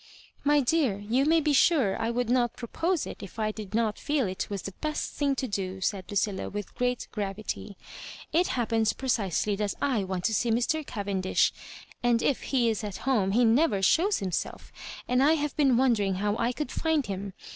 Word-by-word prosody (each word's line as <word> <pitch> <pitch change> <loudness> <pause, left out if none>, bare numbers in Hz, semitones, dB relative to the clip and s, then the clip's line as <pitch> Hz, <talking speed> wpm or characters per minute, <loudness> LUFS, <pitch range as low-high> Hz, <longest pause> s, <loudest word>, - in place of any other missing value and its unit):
" - - -31
My 295 -1 +5
dear, 265 -6 +1
you 230 +7 0
may 325 +2 +4
be 300 -1 +1
sure 275 - +4
I 225 - 0
would 240 0 -1
not 240 -1 +1
pro 235 - -7
pose 335 +5 0
it, - - -8
if 200 0 -10
I 215 -1 0
did 215 -1 -7
not 220 -2 +1
teel 290 -4 0
it 185 -1 -4
was 200 -2 -4
the 195 - -5
best 305 -1 -2
thing 280 -2 0
to 260 - -2
do," 190 -3 -3
said 190 0 -2
Lucilla, 200 -1 -1
with 205 -1 -6
great 250 0 -1
gravity. 205 -1 -5 0.6
It 350 +3 +3
hap 240 -2 0
pens 220 -2 +2
precisely 210 -6 0
that 205 -1 -1
I 255 -8 +1
want 185 -1 -3
to 220 - +1
see 235 +2 +1
Mr. 245 +7 +1
Cavendish, 200 -6 0 0.5
and 240 -1 +2
if 275 - +1
he 250 -4 +2
is 220 -1 -1
at 205 -3 -5
home 210 -8 +2
he 240 +2 +4
never 225 -4 +3
shows 370 - +3
himself, 185 -4 -4 0.4
and 250 +1 +2
I 295 +3 +5
have 295 -2 -1
been 270 -5 +3
wondering 220 -7 +2
how 205 +2 0
I 235 +1 0
could 265 +1 -4
find 320 -4 0
him. 195 0 -5
230 Hz, 210 wpm, -28 LUFS, 200-270 Hz, 0.6 s, My